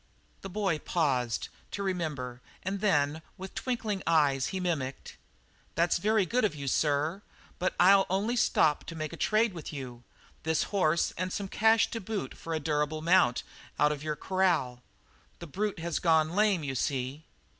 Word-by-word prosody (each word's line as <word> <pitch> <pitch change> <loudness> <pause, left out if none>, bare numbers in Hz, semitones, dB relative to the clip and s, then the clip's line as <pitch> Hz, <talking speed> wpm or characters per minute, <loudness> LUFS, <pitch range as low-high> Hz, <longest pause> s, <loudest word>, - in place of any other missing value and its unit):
The 195 - -7
boy 190 -5 0
paused 130 -10 0 0.2
to 200 - -4
remember 150 -10 -3 0.2
and 195 +1 -3
then 150 -6 +2 0.2
with 190 +1 -8
twinkling 225 -6 -2
eyes 145 -5 +3
he 190 - -3
mimicked: 145 -7 -3 0.6
"'That's 170 +1 +2
very 215 +1 +2
good 245 +7 0
of 205 -7 +1
you, 140 -2 -6
sir, 150 +7 +1 0.4
but 185 - 0
I'll 195 +2 +6
only 200 +6 0
stop 155 -9 +3
to 165 - -7
make 155 0 -4
a - - -4
trade 215 +4 +2
with 165 -4 -7
you 125 -5 -7 0.4
this 160 0 +1
horse 170 -4 +2
and 185 +1 -1
some 200 +1 -3
cash 220 +3 +3
to 230 - -4
boot 195 -9 -4
for 165 -1 -5
a - - -1
durable 155 +1 -1
mount 170 -8 +4 0.3
out 150 0 +4
of 145 -2 -4
your 155 0 -2
corral. 165 -10 0 0.6
The 170 - -8
brute 200 +6 -2
has 170 0 -2
gone 160 -2 +3
lame, 200 -3 +2
you 135 -2 -3
see.' 135 +3 -2
165 Hz, 170 wpm, -29 LUFS, 150-195 Hz, 0.6 s, I'll